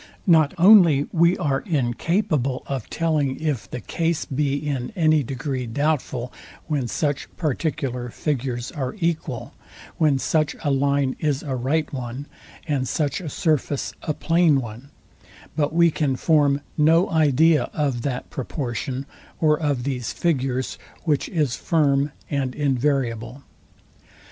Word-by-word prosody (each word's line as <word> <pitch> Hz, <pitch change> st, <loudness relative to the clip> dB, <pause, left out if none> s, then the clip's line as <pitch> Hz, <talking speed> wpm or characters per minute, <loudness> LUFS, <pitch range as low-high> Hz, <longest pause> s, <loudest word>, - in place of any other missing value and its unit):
Not 160 Hz, -6 st, +4 dB
only 170 Hz, -6 st, +7 dB
we 170 Hz, +1 st, +3 dB
are 135 Hz, -2 st, 0 dB
incapable 145 Hz, -, 0 dB
of 135 Hz, -5 st, -4 dB
telling, 155 Hz, -5 st, 0 dB
if 140 Hz, -12 st, -2 dB
the 125 Hz, -, -5 dB
case 165 Hz, -1 st, -1 dB
be 140 Hz, 0 st, 0 dB
in 140 Hz, -4 st, -3 dB
any 155 Hz, -4 st, +3 dB
degree 130 Hz, -1 st, -3 dB
doubtful, 130 Hz, -1 st, -1 dB, 0.3 s
when 145 Hz, -6 st, -1 dB
such 145 Hz, +3 st, -1 dB
particular 135 Hz, -5 st, -2 dB
figures 125 Hz, -3 st, -3 dB
are 130 Hz, -3 st, -4 dB
equal; 160 Hz, -, -2 dB, 0.4 s
when 150 Hz, -4 st, +3 dB
such 155 Hz, +3 st, 0 dB
a 145 Hz, -, +1 dB
line 140 Hz, -1 st, +1 dB
is 145 Hz, -3 st, 0 dB
a 135 Hz, -3 st, -3 dB
right 145 Hz, +6 st, -1 dB
one, 125 Hz, +1 st, -5 dB, 0.4 s
and 135 Hz, -4 st, 0 dB
such 145 Hz, +3 st, -1 dB
a 165 Hz, -, -5 dB
surface 150 Hz, -4 st, -1 dB
a 155 Hz, -, -2 dB
plain 165 Hz, -4 st, +3 dB
one; 120 Hz, +2 st, -8 dB, 0.7 s
but 145 Hz, -2 st, +1 dB
we 170 Hz, +1 st, +4 dB
can 145 Hz, -4 st, 0 dB
form 145 Hz, -1 st, +2 dB
no 160 Hz, +4 st, +4 dB
idea 160 Hz, 0 st, +3 dB
of 140 Hz, -6 st, -1 dB
that 125 Hz, -1 st, -4 dB
proportion, 130 Hz, 0 st, -4 dB, 0.3 s
or 150 Hz, -2 st, +3 dB
of 145 Hz, -6 st, 0 dB
these 125 Hz, -4 st, -2 dB
figures, 130 Hz, -6 st, -1 dB, 0.2 s
which 150 Hz, -4 st, 0 dB
is 150 Hz, -8 st, 0 dB
firm 145 Hz, -3 st, +1 dB, 0.2 s
and 135 Hz, -4 st, -2 dB
invariable. 135 Hz, -3 st, -1 dB
145 Hz, 135 wpm, -23 LUFS, 130-155 Hz, 0.7 s, only